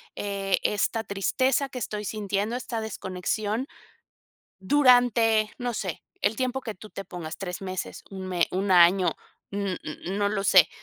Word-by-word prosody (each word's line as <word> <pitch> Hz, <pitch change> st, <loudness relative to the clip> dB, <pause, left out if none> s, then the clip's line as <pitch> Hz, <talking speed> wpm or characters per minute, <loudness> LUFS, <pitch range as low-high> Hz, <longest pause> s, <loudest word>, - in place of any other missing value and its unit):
eh, 195 Hz, -2 st, -1 dB
esta 220 Hz, +2 st, +1 dB
tristeza 260 Hz, +8 st, +1 dB
que 250 Hz, -, -6 dB
estoy 210 Hz, -2 st, -4 dB
sintiendo, 210 Hz, +2 st, -2 dB
esta 235 Hz, -2 st, -3 dB
desconexión", 215 Hz, +4 st, -2 dB, 0.9 s
durante, 235 Hz, -2 st, +4 dB
no 245 Hz, -1 st, -2 dB
sé, 185 Hz, -6 st, -4 dB, 0.2 s
el 205 Hz, +2 st, +2 dB
tiempo 255 Hz, +2 st, -1 dB
que 220 Hz, -4 st, -6 dB
tú 215 Hz, +3 st, -13 dB
te 195 Hz, -, -7 dB
pongas, 170 Hz, -3 st, -7 dB
3 185 Hz, 0 st, -5 dB
meses, 185 Hz, -1 st, -5 dB
1 190 Hz, -1 st, -6 dB
me 180 Hz, -2 st, +1 dB
1 190 Hz, +1 st, -1 dB
año, 180 Hz, +1 st, +6 dB, 0.4 s
n 200 Hz, -2 st, -2 dB
n 155 Hz, -, -7 dB
n 195 Hz, +2 st, -2 dB
no 205 Hz, 0 st, +2 dB
lo 200 Hz, -1 st, -1 dB
sé, 185 Hz, -4 st, +6 dB
205 Hz, 160 wpm, -26 LUFS, 190-225 Hz, 0.9 s, año